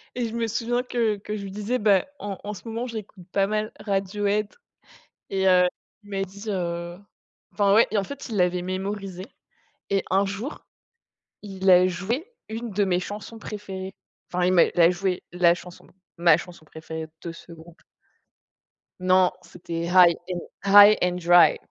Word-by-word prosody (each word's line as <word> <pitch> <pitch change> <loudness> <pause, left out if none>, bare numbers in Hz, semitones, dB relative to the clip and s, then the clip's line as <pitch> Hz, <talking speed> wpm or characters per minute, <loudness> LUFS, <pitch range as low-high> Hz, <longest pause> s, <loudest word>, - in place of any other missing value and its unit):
et 240 -2 -1
je - - -9
me 230 -1 -1
souviens 240 +3 -1
que 230 -4 0
que 210 +1 -6
je 200 - -6
lui 195 - -7
disais, 210 +5 -2
bah 205 -3 +3
en 200 -2 -5
en 210 +1 -5
ce 200 +4 -11
moment, 230 +3 -4
j'écoute 210 -5 -8
pas 195 0 +2
mal 215 0 -2
Radiohead 205 +1 -1 0.8
et 190 0 0
heu 180 -1 +5 0.4
il 205 - -15
m'a 195 0 -2
dit 200 +2 -8
heu 175 -2 -3 0.6
enfin 200 -1 +3
ouais 225 - +6
et 210 - 0
en 195 - 0
fait, 280 +1 -8
il 220 - -4
l'avait 180 -1 +1
mémorisé 190 0 -5 0.6
et 195 -1 +1
un 195 +1 +3
jour, 205 +9 -6 0.8
il 190 -2 -4
a 180 0 +7
joué 230 - -3 0.2
une 225 +1 -5
de 205 +1 +1
mes 180 -1 +1
chansons 210 +3 -7
préférées. 195 -3 -7 0.4
Enfin 180 0 0
il 185 - +3
m'a 175 - +6
il 175 - -2
a 170 +1 +7
joué 180 0 -2
la 175 -1 +4
chanson, 180 0 -12 0.3
ma 170 -2 +5
chanson 175 -2 -10
préférée 160 0 -8 0.2
de 170 - -5
ce 170 +1 -14
groupe. 165 +1 -15 1.2
Non, 185 0 +4
c'était 170 -1 -6
High 175 -2 +6 0.2
and 175 -1 -2 0.3
High 205 +1 +9
and 180 0 +1
Dry. 175 0 +6
195 Hz, 175 wpm, -24 LUFS, 180-210 Hz, 1.2 s, High